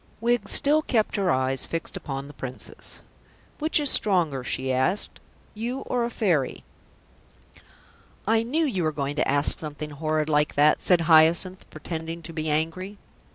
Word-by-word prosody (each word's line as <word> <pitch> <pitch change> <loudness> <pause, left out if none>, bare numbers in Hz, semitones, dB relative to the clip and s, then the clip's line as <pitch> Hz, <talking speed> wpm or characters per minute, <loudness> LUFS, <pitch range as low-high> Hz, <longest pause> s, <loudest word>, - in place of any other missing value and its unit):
Wiggs 235 -3 +1
still 300 +2 +5
kept 225 -8 0
her 195 -3 +1
eyes 130 0 0
fixed 165 0 -4
upon 135 -1 -5
the 145 - -11
Princess. 130 -2 -6 0.6
"Which 310 +1 +2
is 290 -2 +2
stronger," 165 -10 +1
she 130 +1 -2
asked, 130 +11 -1 0.3
"you 240 +5 -4
or 245 -3 -1
a - - -3
Fairy?" 175 - 0 1.6
"I 225 +1 +3
knew 295 +8 0
you 195 -11 -1
were 155 -2 +1
going 145 -1 -3
to - - +1
ask 145 +2 +2
something 150 -1 -6
horrid 155 +1 -1
like 150 -1 +1
that," 150 +1 +4
said 180 -2 +3
Hyacinth, 165 +4 +4
pretending 165 +1 -6
to 165 - -7
be 155 -1 -3
angry. 165 +6 -2
165 Hz, 155 wpm, -25 LUFS, 150-210 Hz, 1.6 s, still